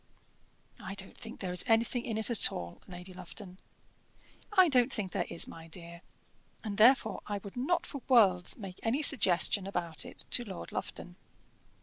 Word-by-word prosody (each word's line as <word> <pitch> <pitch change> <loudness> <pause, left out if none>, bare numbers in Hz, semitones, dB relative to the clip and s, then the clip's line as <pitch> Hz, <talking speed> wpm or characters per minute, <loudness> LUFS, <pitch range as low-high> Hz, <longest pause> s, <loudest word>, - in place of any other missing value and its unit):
"I 195 - -7
don't 195 -1 -5
think 230 -1 -10
there 185 -2 -3
is 180 - -2
anything 235 +1 +2
in 225 -2 -2
it 220 +2 0
at 230 - +4
all, 85 -1 -7
Lady 180 0 -9
Lufton." 180 +1 -9 0.9
"I 375 -3 +6
don't 255 -3 +3
think 200 -7 -3
there 185 -3 -1
is, 170 - +4
my 165 0 -10
dear, 170 0 -8 0.6
and 210 -2 -4
therefore 220 -3 +5
I 205 - -2
would 200 0 -10
not 345 +8 0
for 280 -5 -6
worlds 190 -8 +4
make 195 -5 -8
any 255 +7 0
suggestion 195 -5 +3
about 170 -4 -3
it - - -10
to 245 - +3
Lord 195 -6 -8
Lufton. 180 0 -6
200 Hz, 175 wpm, -31 LUFS, 180-235 Hz, 0.9 s, I